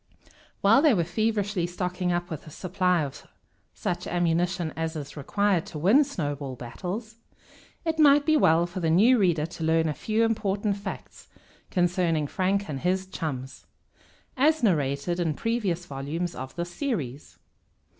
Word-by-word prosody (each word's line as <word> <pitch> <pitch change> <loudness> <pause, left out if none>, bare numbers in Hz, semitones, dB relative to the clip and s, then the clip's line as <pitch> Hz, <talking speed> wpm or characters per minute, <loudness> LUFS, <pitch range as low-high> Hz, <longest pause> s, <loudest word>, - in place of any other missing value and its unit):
While 220 +7 +6
they 305 -4 +5
are 175 -5 +2
feverishly 205 0 0
stocking 180 0 -2
up 175 0 -2
with 155 -1 -6
a - - -8
supply 180 +1 0
of 140 -2 -8 0.5
such 175 0 -3
ammunition 175 -1 0
as 160 0 -3
is 145 -2 -6
required 190 +4 0
to - - -7
win 205 - +5
snowball 145 - -4
battles, 195 - -6 0.7
it 320 -1 -1
might 290 -1 +6
be 315 0 +4
well 170 - +4
for 175 +2 -6
the 165 -2 0
new 225 +10 +5
reader 170 -6 +2
to 165 0 -7
learn 160 0 +2
a 155 - 0
few 220 +8 0
important 205 -2 0
facts 200 -1 -8 0.4
concerning 175 -4 +1
Frank 195 +6 0
and 140 -3 -4
his 185 +3 0
chums, 135 -8 -6 0.7
as 305 +2 +3
narrated 150 -2 +1
in 165 -4 0
previous 205 -6 -1
volumes 155 +4 -4
of 130 0 -7
this 175 0 -4
series. 145 - -4
175 Hz, 155 wpm, -26 LUFS, 160-205 Hz, 0.7 s, While